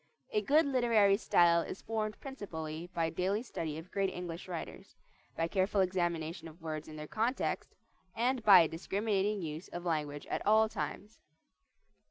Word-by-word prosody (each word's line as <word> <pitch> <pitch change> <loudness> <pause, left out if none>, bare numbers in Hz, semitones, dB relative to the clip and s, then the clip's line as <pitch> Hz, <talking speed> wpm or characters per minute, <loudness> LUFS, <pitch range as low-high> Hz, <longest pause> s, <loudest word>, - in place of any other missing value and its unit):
A 425 -3 +2
good 305 0 +4
literary 235 -7 +4
style 170 -5 +4
is 185 - -7
formed 215 -1 -2
principally 165 - -6
by 165 -2 0
daily 190 +6 0
study 160 -10 -4
of 165 +3 -10
great 195 -1 +1
English 175 0 -6
writers, 175 -3 -7 0.4
by 165 - +1
careful 190 +3 +1
examination 170 -3 -1
of 160 +2 -13
words 155 -2 -5
in 155 - -9
their 150 0 -6
context, 230 - -1 0.4
and 250 +2 +1
by 195 -4 +9
a 165 - +3
discriminating 200 +4 -1
use 155 +2 -5
of 175 0 -7
language 150 -3 -2
at - - -3
all 220 +1 +5
times. 215 0 -5
185 Hz, 160 wpm, -33 LUFS, 165-215 Hz, 0.4 s, by